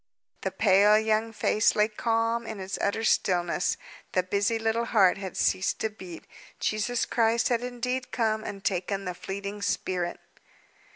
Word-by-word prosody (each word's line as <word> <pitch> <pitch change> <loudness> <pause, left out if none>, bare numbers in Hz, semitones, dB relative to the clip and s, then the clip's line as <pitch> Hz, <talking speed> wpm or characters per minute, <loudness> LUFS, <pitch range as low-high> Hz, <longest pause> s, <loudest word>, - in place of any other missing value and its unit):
The 190 - -1
pale 200 +2 +5
young 220 +1 +1
face 215 -1 +2
lay 210 0 +4
calm 230 +1 -1
in 215 - -6
its 190 0 -4
utter 210 +3 0
stillness; 175 -4 +1 0.4
the 185 - +2
busy 200 +4 0
little 225 +1 0
heart 195 -5 +4
had 190 -2 -6
ceased 185 - +1
to 220 - -1
beat. 185 -5 -10 0.4
Jesus 215 +3 0
Christ 230 0 +2
had 240 -2 +1
indeed 250 +1 -3
come 220 -2 0
and 200 -2 -7
taken 195 +1 -1
the 180 - -3
fleeting 200 +3 -6
spirit. 180 -2 -2
210 Hz, 155 wpm, -27 LUFS, 190-225 Hz, 0.4 s, pale